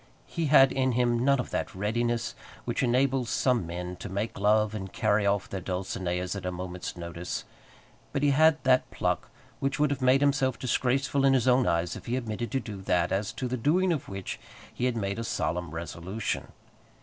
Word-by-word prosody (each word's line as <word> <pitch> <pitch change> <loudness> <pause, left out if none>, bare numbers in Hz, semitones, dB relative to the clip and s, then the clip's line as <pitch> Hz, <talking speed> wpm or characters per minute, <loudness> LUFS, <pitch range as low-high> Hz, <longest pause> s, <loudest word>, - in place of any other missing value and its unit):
He 165 -3 -2
had 135 -2 +7
in 130 -1 +1
him 120 0 +2
none 140 0 +4
of 125 - -4
that - - -3
readiness 115 +4 -1 0.3
which - - -1
enables 130 0 +2
some 125 -9 +1
men 90 +1 -5
to 100 - -7
make 100 +2 -3
love 105 +1 +3
and 95 -3 -5
carry 105 -1 +2
off 100 0 +1
their 95 -4 -5
Dulcineas 90 0 -2
at 100 - -5
a 90 - -2
moment's 90 0 -6
notice, 85 +1 -5 0.7
but 140 - -1
he 145 - +4
had 155 +2 +5
that 130 -1 +3
pluck - - -1 0.3
which 135 +1 -1
would 150 -1 +2
have 140 - -2
made 130 +2 +4
himself 135 -3 +2
disgraceful 130 +2 +1
in 135 -1 +5
his 130 -2 +2
own 125 0 +4
eyes 85 +1 0
if - - -10
he 120 +2 0
omitted 115 -1 -3
to 135 - +2
do 105 -5 -7
that 90 -2 +1
as 100 +1 0
to 130 - -3
the 130 +1 -2
doing 175 +9 +2
of 150 - -4
which 95 -1 -5 0.3
he 125 - -2
had 125 -2 0
made 100 0 -2
a - - -2
solemn 85 -5 -2
resolution. 85 +6 -4
115 Hz, 200 wpm, -28 LUFS, 95-130 Hz, 0.7 s, had